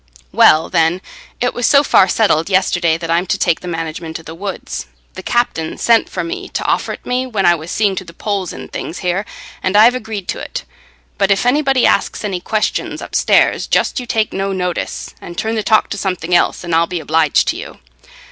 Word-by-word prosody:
"Well, 155 Hz, +1 st, +5 dB
then, 165 Hz, +2 st, +2 dB, 0.4 s
it 245 Hz, -, 0 dB
was 240 Hz, -1 st, 0 dB
so 280 Hz, 0 st, +5 dB
far 190 Hz, -, +5 dB
settled 195 Hz, -6 st, +2 dB
yesterday 175 Hz, -3 st, +2 dB
that 165 Hz, 0 st, -4 dB
I'm 175 Hz, +2 st, +1 dB
to -, -, 0 dB
take 165 Hz, -, +1 dB
the 180 Hz, -, -9 dB
management 165 Hz, -1 st, -5 dB
o' -, -, -13 dB
the 160 Hz, -, -9 dB
woods. 175 Hz, -, -6 dB, 0.3 s
The -, -, -8 dB
captain 225 Hz, -9 st, -1 dB
sent 230 Hz, -1 st, +3 dB
for 180 Hz, -, -3 dB
me 170 Hz, -, -5 dB
t' -, -, -3 dB
offer -, -, 0 dB
it -, -, -11 dB
me, 255 Hz, +1 st, -1 dB
when 210 Hz, -6 st, -1 dB
I 175 Hz, -, +6 dB
was 165 Hz, 0 st, -6 dB
seeing 205 Hz, -1 st, +1 dB
to -, -, -3 dB
the 170 Hz, -, -12 dB
poles 195 Hz, +1 st, -3 dB
and -, -, -9 dB
things 165 Hz, -, -5 dB
here 185 Hz, +3 st, 0 dB, 0.4 s
and 190 Hz, +2 st, +1 dB
I've 225 Hz, +3 st, +7 dB
agreed 220 Hz, -6 st, -5 dB
to't. -, -, -4 dB, 0.6 s
But 195 Hz, -1 st, +2 dB
if 200 Hz, +3 st, +2 dB
anybody 270 Hz, 0 st, +3 dB
asks -, -, +1 dB
any 190 Hz, -3 st, -3 dB
questions 215 Hz, +3 st, -1 dB
upstairs, -, -, +2 dB
just -, -, +1 dB
you 250 Hz, -, -7 dB
take 220 Hz, -1 st, 0 dB
no 195 Hz, +1 st, -2 dB
notice, 180 Hz, -2 st, -3 dB
and 175 Hz, -, -9 dB
turn 220 Hz, +1 st, -1 dB
the 220 Hz, -, 0 dB
talk 215 Hz, +1 st, +3 dB
to 200 Hz, -, -3 dB
something 180 Hz, -3 st, -2 dB
else, 175 Hz, -, +2 dB
and 170 Hz, -1 st, -4 dB
I'll 165 Hz, +1 st, +3 dB
be 175 Hz, 0 st, -3 dB
obliged 155 Hz, -1 st, +2 dB
to -, -, -1 dB
you. -, -, -9 dB
185 Hz, 215 wpm, -17 LUFS, 170-220 Hz, 0.6 s, I've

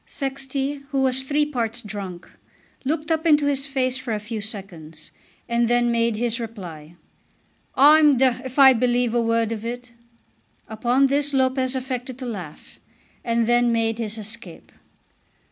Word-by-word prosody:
Sexty, 275 Hz, +1 st, -3 dB
who 275 Hz, -2 st, 0 dB
was 260 Hz, 0 st, +1 dB
three 290 Hz, +3 st, +1 dB
parts 240 Hz, -5 st, -3 dB
drunk, 195 Hz, -4 st, -7 dB, 0.6 s
looked 305 Hz, +3 st, -2 dB
up 320 Hz, +1 st, +1 dB
into 295 Hz, -2 st, +4 dB
his 280 Hz, -1 st, 0 dB
face 260 Hz, -2 st, -1 dB
for 245 Hz, -4 st, -3 dB
a -, -, -3 dB
few 215 Hz, +1 st, -6 dB
seconds, 175 Hz, -7 st, -7 dB, 0.4 s
and 235 Hz, 0 st, +1 dB
then 240 Hz, 0 st, +2 dB
made 230 Hz, -1 st, +1 dB
his 235 Hz, +1 st, -1 dB
reply. 175 Hz, -9 st, -8 dB, 0.8 s
"I'm 295 Hz, 0 st, +6 dB
d 265 Hz, +2 st, +5 dB
d 235 Hz, -, -7 dB
if 260 Hz, +1 st, -8 dB
I 270 Hz, -2 st, +8 dB
believe 245 Hz, -1 st, +1 dB
a 240 Hz, -, +2 dB
word 230 Hz, -1 st, +1 dB
of 220 Hz, -1 st, -4 dB
it." 245 Hz, +1 st, -6 dB, 0.8 s
Upon 240 Hz, +5 st, +1 dB
this 285 Hz, +1 st, 0 dB
Lopez 260 Hz, 0 st, +1 dB
affected 255 Hz, -1 st, -4 dB
to 260 Hz, -, -7 dB
laugh, 190 Hz, -10 st, -8 dB, 0.4 s
and 230 Hz, 0 st, +1 dB
then 240 Hz, +1 st, +3 dB
made 225 Hz, 0 st, 0 dB
his 220 Hz, -1 st, -3 dB
escape. 215 Hz, -4 st, -9 dB
240 Hz, 160 wpm, -23 LUFS, 225-265 Hz, 0.8 s, I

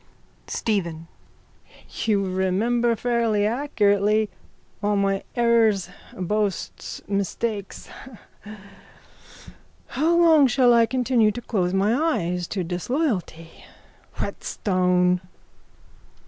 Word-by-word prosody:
STEPHEN: 170 Hz, -7 st, -2 dB, 1.0 s
You 205 Hz, -3 st, +1 dB
remember 210 Hz, +6 st, +1 dB
fairly 230 Hz, -3 st, 0 dB
accurately 210 Hz, -4 st, +1 dB, 0.5 s
all 205 Hz, 0 st, +1 dB
my 195 Hz, -1 st, 0 dB
errors, 230 Hz, -6 st, +2 dB, 0.3 s
boasts, 200 Hz, +1 st, -3 dB
mistakes. 200 Hz, +1 st, -3 dB, 2.0 s
How 325 Hz, +5 st, +1 dB
long 320 Hz, -5 st, +6 dB
shall 250 Hz, -1 st, +4 dB
I 230 Hz, -1 st, +4 dB
continue 245 Hz, -3 st, +2 dB
to 240 Hz, -, -6 dB
close 185 Hz, -6 st, -1 dB
my 200 Hz, +3 st, +2 dB, 0.2 s
eyes 175 Hz, 0 st, -2 dB
to 190 Hz, -3 st, -3 dB
disloyalty? 180 Hz, -, -3 dB, 0.6 s
Whetstone! 180 Hz, -2 st, 0 dB
210 Hz, 80 wpm, -23 LUFS, 185-235 Hz, 2.0 s, long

